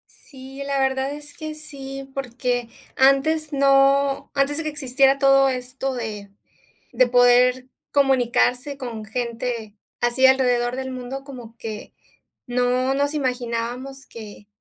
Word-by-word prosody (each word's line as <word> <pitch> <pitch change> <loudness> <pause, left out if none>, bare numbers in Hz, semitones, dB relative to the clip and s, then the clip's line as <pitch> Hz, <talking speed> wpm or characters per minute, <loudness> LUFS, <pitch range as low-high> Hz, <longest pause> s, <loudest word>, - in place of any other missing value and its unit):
Sí, 270 0 -11
la 275 -1 -1
verdad 265 +1 0
es 295 0 -10
que 310 0 -6
sí, 275 -3 -9
porque 245 -2 -2 0.3
antes 295 +4 +3
no 275 0 +3
antes 280 +1 +1
de 325 - -2
que - - -1
existiera 275 -2 +2
todo 275 0 +5
esto 260 +1 -3
de 210 -4 -6 0.6
de 255 - +4
poder 250 +1 +4 0.2
comunicarse 265 0 +2
con 235 -5 -6
gente 235 -1 -4 0.3
así 240 +2 +3
alrededor 250 -2 +3
del 260 0 -4
mundo, 255 +2 -6
como 245 -5 -11
que 220 -2 -7 0.5
no 250 +2 +1
nos 285 +1 0
imaginábamos 250 0 -3
que 210 -2 -11
265 Hz, 125 wpm, -22 LUFS, 245-275 Hz, 0.6 s, todo